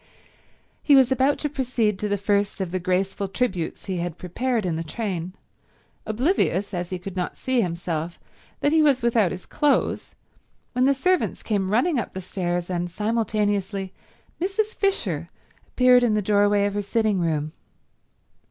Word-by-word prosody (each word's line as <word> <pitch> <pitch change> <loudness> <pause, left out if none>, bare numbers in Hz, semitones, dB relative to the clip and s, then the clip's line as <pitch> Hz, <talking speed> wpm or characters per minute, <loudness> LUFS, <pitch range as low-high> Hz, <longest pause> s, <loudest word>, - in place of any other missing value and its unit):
He 290 - +5
was 265 -2 +5
about 265 +2 +3
to 295 - -1
proceed 245 -8 -1
to 210 - -2
the 205 - +1
first 200 0 0
of 185 -3 -3
the 185 - -1
graceful 190 +2 -1
tributes 190 -5 -2
he 190 -2 -3
had 170 -1 -3
prepared 230 +5 -1
in 170 -3 0
the 165 - -3
train, 185 -1 -4 0.7
oblivious, 215 - +1
as 175 -1 -3
he 185 - -3
could 180 +1 -8
not 180 -1 -3
see 260 -2 +1
himself, 170 -2 -3 0.4
that 290 - +2
he 320 0 +4
was 280 -5 +3
without 230 -5 +3
his 185 - -7
clothes, 295 -2 0 0.6
when 250 +1 +2
the 275 +1 +4
servants 365 +6 0
came 200 -4 0
running 255 - +2
up - - -5
the 190 - -4
stairs 175 -1 -2
and, 175 -1 -2
simultaneously, 205 -2 -1 0.5
Mrs. 415 +4 0
Fisher 395 -1 -1 0.4
appeared 250 -1 +5
in 235 -3 +2
the 210 - +2
doorway 205 0 +3
of 205 - -1
her 205 - -1
sitting 215 -1 +1
room. 155 -3 -1
205 Hz, 165 wpm, -24 LUFS, 185-250 Hz, 0.7 s, He